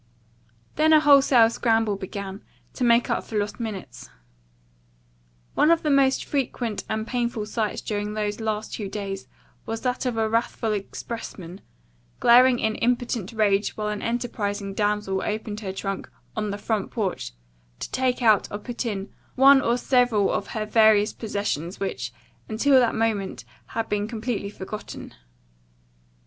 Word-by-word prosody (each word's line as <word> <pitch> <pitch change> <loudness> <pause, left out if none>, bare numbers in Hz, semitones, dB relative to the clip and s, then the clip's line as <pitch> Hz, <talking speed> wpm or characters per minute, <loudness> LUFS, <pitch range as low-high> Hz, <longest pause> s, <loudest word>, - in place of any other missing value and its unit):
Then 315 +1 +5
a 310 - +8
wholesale 275 -6 +6
scramble 225 -3 +1
began, 195 0 -6 0.3
to - - -3
make 235 0 +4
up - - 0
for 220 - -4
lost 205 +1 -2
minutes. 210 - -6 1.4
One 300 - +4
of 335 -1 +3
the 300 - +1
most 275 -1 +3
frequent 245 -5 -2
and 220 0 -2
painful 235 -3 -2
sights 215 0 -2
during 210 0 -3
those 210 0 -2
last 220 -1 -3
two 205 -3 -4
days 195 -1 -5 0.4
was 225 0 -3
that 250 0 -1
of 240 -2 -2
a 220 0 +2
wrathful 230 0 0
expressman, 195 -3 -6 0.6
glaring 250 +1 +6
in 220 -2 0
impotent 240 -4 -1
rage 210 -2 +1
while 210 -1 -2
an 210 -1 -3
enterprising 205 -4 -2
damsel 205 -2 0
opened 215 0 -3
her 200 -3 -4
trunk 195 0 -4 0.3
on 215 -1 -2
the 200 - -3
front 210 -1 -2
porch 185 - -3 0.4
to - - -6
take 255 -1 0
out 215 -3 +4
or 205 - -3
put 235 +3 -5
in 200 -2 -4 0.2
one 270 +1 +7
or 235 0 +1
several 245 -5 +2
of - - -2
her 215 - -1
various 215 -1 +4
possessions 200 -5 -3
which, 195 - -3 0.4
until 260 +5 +4
that 240 -2 +2
moment, 220 -4 -1 0.2
had 225 0 -3
been 210 0 -1
completely 225 -2 -3
forgotten. 210 +1 -8
220 Hz, 150 wpm, -25 LUFS, 205-240 Hz, 1.4 s, a